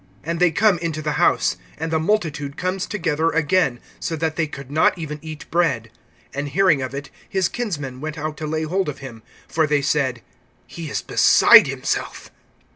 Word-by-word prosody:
And 165 +1 -3
they 180 0 +5
come 190 +2 +3
into 160 -2 -3
the 150 - -1
house. - - +3 0.2
(20)And 160 +1 -3
the 160 - +2
multitude 155 -6 -1
comes 185 +1 -2
together 165 -5 0
again, 160 -5 +1 0.2
so 165 - -3
that 160 0 -2
they 160 -1 0
could 140 -2 -9
not 160 +4 +3
even 150 -2 -5
eat 155 -2 -8
bread. 135 -10 +1 0.4
(21)And 145 +1 -3
hearing 175 -2 +3
of 130 +1 -4
it, 140 0 -7 0.2
his 190 -2 +1
kinsmen 145 - -4
went 155 0 -5
out 155 0 -4
to 155 - -4
lay 155 +1 -1
hold 185 +2 -1
of 145 - -6
him; 120 -5 -10 0.3
for 160 -1 +1
they 145 -1 +1
said: 130 -5 0 0.4
He 165 -3 -8
is - - -3
beside - - +7
himself. - - -3
155 Hz, 190 wpm, -21 LUFS, 145-170 Hz, 0.4 s, beside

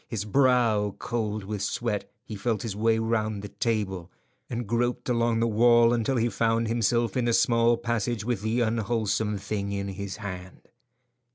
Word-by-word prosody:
His 105 -3 -4
brow 115 -4 +2
cold 110 -3 -3
with 105 0 -4
sweat, 110 -2 -2 0.2
he 110 - -7
felt 110 0 -1
his 110 -4 -4
way 110 +1 +2
round 110 -2 -1
the 105 - -6
table, 95 -7 -2 0.4
and 120 0 -3
groped 120 +3 -1
along 115 -1 +1
the 115 - +2
wall 120 +1 +5
until 120 +3 0
he 115 0 +2
found 115 0 +1
himself 115 -1 +1
in 125 - +1
the 120 - +2
small 115 0 +3
passage 115 -2 -2
with 120 -5 -1
the 110 +3 0
unwholesome 110 -2 0
thing 100 0 -3
in 100 0 -3
his 100 0 -6
hand. 95 -3 -8
115 Hz, 170 wpm, -26 LUFS, 105-120 Hz, 0.4 s, wall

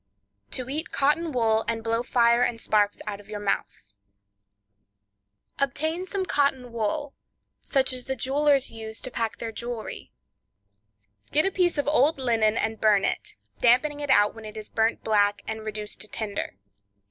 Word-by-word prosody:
To 255 -1 -2
Eat 305 +5 -3
Cotton 305 +4 +2
Wool 225 -3 +2
and 225 -1 -1
Blow 230 +1 +1
Fire 235 -1 +3
and 240 -2 +1
Sparks 210 -2 +1
Out 205 -2 -4
of 205 0 -16
Your 210 -1 -5
Mouth.—Obtain 100 - -6
some 385 0 -2
Cotton 275 -6 +1
wool, 270 +6 -2 0.5
such 265 -2 +1
as 250 -1 -4
the 265 - -2
jewelers 275 +2 +2
use 220 0 -5
to 255 - -5
pack 230 -2 -2
their 230 - -4
jewelry; 235 0 -6 1.2
get 305 +4 +3
a 385 - +2
piece 355 -4 +1
of 290 - 0
old 295 +1 +3
linen 230 -4 +2
and 220 0 -1
burn 210 -2 +4
it, - - -3 0.2
dampening 270 +5 +3
it 290 -1 -4
out 210 -6 +5
when 225 - -11
it 215 0 -9
is 215 - -8
burnt 225 +1 0
black 205 -1 +2
and 220 0 -4
reduced 215 -1 -5
to 215 - -3
tinder. 205 - -4
230 Hz, 160 wpm, -26 LUFS, 210-270 Hz, 1.2 s, out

